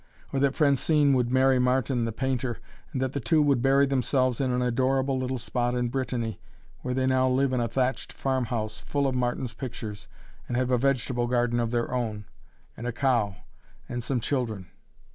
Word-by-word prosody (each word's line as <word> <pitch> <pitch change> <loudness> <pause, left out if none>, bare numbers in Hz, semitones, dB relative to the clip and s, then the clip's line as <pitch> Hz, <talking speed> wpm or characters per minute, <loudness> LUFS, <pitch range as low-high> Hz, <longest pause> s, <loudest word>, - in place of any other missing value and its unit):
Or 135 - +1
that 140 0 +2
Francine 145 0 +3
would 125 -2 +2
marry 130 0 +4
Martin, 125 -1 +1
the 115 - -2
painter, 130 0 -2 0.3
and 130 - -3
that 130 0 -2
the 140 - -1
two 140 +6 +2
would 140 -4 +2
bury 135 +2 +4
themselves 130 -1 +1
in 130 - +1
an 125 0 +1
adorable 130 +2 +1
little 130 0 -2
spot 120 0 -1
in 125 -1 0
Brittany, 120 -4 -2 0.4
where 125 0 -3
they 130 0 +1
now 130 0 +3
live 130 +1 +2
in 125 - +1
a 120 - 0
thatched 130 +3 -1
farm 130 -2 -1
house, 110 -3 -3
full 140 -1 -1
of 135 - +1
Martin's 125 -1 -1
pictures, 110 -5 -6 0.4
and 120 - -2
have 130 0 0
a 125 - +4
vegetable 125 -2 +1
garden 120 -1 +1
of 115 -1 0
their 120 +1 -1
own 110 -4 -2 0.5
and 120 - -6
a - - 0
cow 120 -6 +1 0.5
and 120 -1 -4
some 130 +1 0
children! 110 - -2
125 Hz, 195 wpm, -27 LUFS, 120-135 Hz, 0.5 s, marry